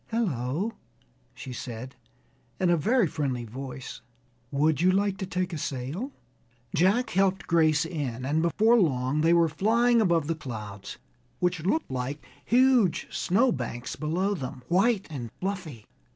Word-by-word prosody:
"Hello!" 180 - -1 0.6
she 125 +2 -8
said, 125 +1 -7 0.6
in 180 -2 +3
a - - +5
very 220 - +3
friendly 135 -6 -2
voice: 130 +3 -7 0.5
"would 150 +1 +1
you 185 +1 +5
like 200 +1 +1
to 190 - -3
take 180 0 -2
a 160 - -3
sail?" 145 - -4 0.6
Jack 195 +10 +3
helped 190 -2 +1
Grace 160 -1 +3
in, 135 -7 -4
and 150 +4 +1
before 220 +8 +4
long 135 -4 +1
they 165 +1 +4
were 170 -1 +5
flying 230 +8 +3
above 170 -6 +2
the 165 - 0
clouds, 105 -9 -7 0.4
which 180 -3 0
looked 315 - 0
like 130 +3 -4 0.2
huge 245 -6 +3
snow 235 +8 +2
banks 120 - -4
below 175 +7 0
them, 130 -7 -6
white 195 +4 +3
and 125 -6 -5
fluffy. 180 - -4
165 Hz, 145 wpm, -27 LUFS, 130-195 Hz, 0.6 s, a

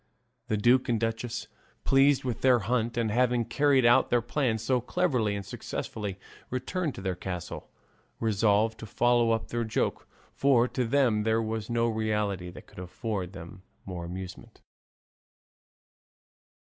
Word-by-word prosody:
The 110 - 0
duke 125 +5 +3
and 115 -2 +2
duchess, 115 +1 -3 0.4
pleased 135 +1 +4
with 125 -3 -3
their 130 -2 +5
hunt 120 +1 -1
and 115 -2 +1
at - - -2
having 125 -1 +2
carried 135 +1 +3
out 120 +2 +5
their 120 - +3
plans 120 -3 -1
so 125 +1 +1
cleverly 125 - 0
and 100 -1 -5
successfully, 100 0 -5 0.3
returned 145 +5 -2
to - - -7
their 95 -1 -1
castle 90 -1 -6 0.5
resolved 110 0 +2
to 110 - -8
follow 120 +1 +3
up 115 -1 0
their 120 0 -1
joke; 110 - -2 0.3
for 130 -3 +3
to 125 - -1
them 120 -3 +2
there 110 +1 +2
was 110 -1 -3
no 115 0 +1
reality 105 -5 -1
that 90 - -12
could - - -13
afford 95 0 -4
them 85 -1 -10 0.2
more 90 -3 -6
amusement. 90 +2 -8
115 Hz, 150 wpm, -28 LUFS, 105-125 Hz, 0.5 s, their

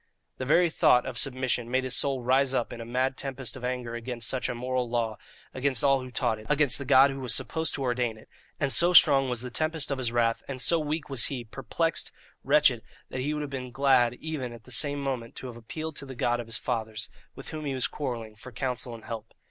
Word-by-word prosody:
The 130 - -2
very 170 +3 +4
thought 125 -5 +4
of 125 -2 -3
submission 130 -3 -1
made 130 +1 +1
his 130 -1 0
soul 135 -3 +1
rise 130 +2 +3
up 120 - -1
in 120 - -7
a - - -6
mad 130 +3 0
tempest 135 -3 -4
of 130 - -10
anger 125 -2 -3
against 120 -1 -2
such 130 - 0
a 125 - -3
moral 125 0 -2
law, 115 -2 -1 0.3
against 130 -2 0
all 135 -1 +4
who 130 - -8
taught 110 -2 0
it, 110 - -13
against 150 -3 +3
the 140 - -5
God 135 +2 +6
who 135 - -6
was 130 -2 0
supposed 160 -2 -1
to 135 - -3
ordain 120 -3 -1
it; 110 - -16 0.3
and 145 -3 +2
so 175 +4 +5
strong 135 -5 +7
was 120 -2 -1
the 125 -1 -6
tempest 155 +2 -1
of 135 - -1
this 125 -3 0
wrath, 115 -1 +1
and 135 -2 -5
so 165 +6 +3
weak 155 0 -3
was 135 -4 +2
he, 130 -4 -3
perplexed, 135 +8 -1 0.3
wretched, 140 -4 +4 0.3
that 130 - -4
he 145 +3 -1
would 150 0 -2
have 145 -1 -5
been 130 -2 -5
glad 125 -2 +3
even 135 -5 -5
at 115 -1 -12
the 125 - -13
same 145 +2 0
moment 130 -4 -4
to - - -7
have 125 -2 -7
appealed 155 +7 -6
to 140 - -5
the 130 - -8
God 120 0 0
of 120 - -6
his 115 - -3
fathers, 110 -3 -3 0.3
with - - -8
whom 155 -1 -6
he 140 -2 -2
was 130 - 0
quarrelling, 120 -6 -4
for 125 +4 -11
counsel 125 0 -3
and 115 - -13
help. 115 -2 -7
130 Hz, 245 wpm, -28 LUFS, 120-140 Hz, 0.3 s, strong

